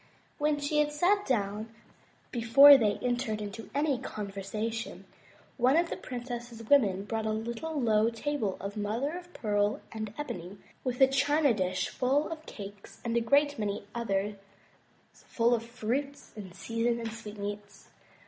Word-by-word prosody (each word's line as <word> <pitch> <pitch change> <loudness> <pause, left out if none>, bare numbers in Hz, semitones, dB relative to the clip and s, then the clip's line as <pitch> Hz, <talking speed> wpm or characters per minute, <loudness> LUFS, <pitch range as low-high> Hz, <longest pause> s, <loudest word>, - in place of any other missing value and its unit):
When 295 0 +1
she 290 +1 0
had 295 0 +2
sat 370 +7 +2
down, 215 -2 -1 0.6
before 260 +5 +8
they 215 -6 +3
entered 245 -3 -1
into 210 +2 -7
any 285 -3 +1
con 210 -5 -5
versation, 215 +4 -4 0.5
one 260 +4 +4
of 340 0 +1
the - - -1
princess's 240 -2 -6
women 205 -9 +4
brought 220 0 -2
a - - +1
little 235 +8 -3
low 220 -2 +3
table 230 -3 -2
of 200 +2 -5
mother 225 +9 -2
of 355 0 -9
pearl 205 -1 0
and 215 -2 -5
ebony, 190 - -6 0.3
with 250 0 -2
a 265 - +9
china 285 +1 +3
dish 185 -3 -1
full 270 +4 +1
of 315 -1 -7
cakes, 200 -1 -10
and 230 0 -1
a 235 - +3
great 285 +4 +3
many 205 -1 -2
others 205 -3 -1 0.8
full 235 +1 0
of 235 - +1
fruits 245 +5 -3
in 200 -4 -8
season 230 +5 -1
and 230 -1 -4
sweetmeats. 205 -2 -7
230 Hz, 155 wpm, -30 LUFS, 210-275 Hz, 0.8 s, a